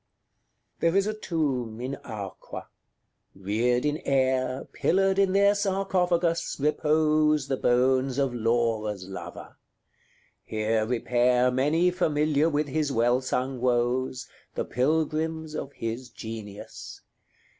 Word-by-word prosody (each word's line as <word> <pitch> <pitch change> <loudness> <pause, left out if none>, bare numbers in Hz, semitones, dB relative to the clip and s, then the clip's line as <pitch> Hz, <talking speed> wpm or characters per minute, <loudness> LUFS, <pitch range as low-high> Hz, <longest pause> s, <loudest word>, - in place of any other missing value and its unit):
XXX. - - -50
There 165 +2 +2
is 195 - +3
a 215 - -1
tomb 135 - -2
in 130 +3 -3
Arqua; 105 -5 -7 0.7
reared 115 +7 0
in 150 0 +1
air, 130 -3 0
Pillared 195 +1 +2
in 195 -1 +3
their 200 +1 +5
sarcophagus, 180 -4 0
repose 150 0 +2
The 135 -1 -1
bones 130 +2 +2
of 135 -3 +1
Laura's 115 -4 0
lover: 95 - -9 0.9
here 110 0 0
repair 125 +1 +2
Many 150 +8 +2
familiar 155 -3 +2
with 150 -1 0
his 150 0 -1
well 120 +1 +2
sung 130 0 -2
woes, 125 +1 0 0.3
The - - -1
pilgrims 160 +3 -1
of 140 - -5
his 115 +3 -5
genius. 110 -3 -8
130 Hz, 115 wpm, -27 LUFS, 120-160 Hz, 0.9 s, their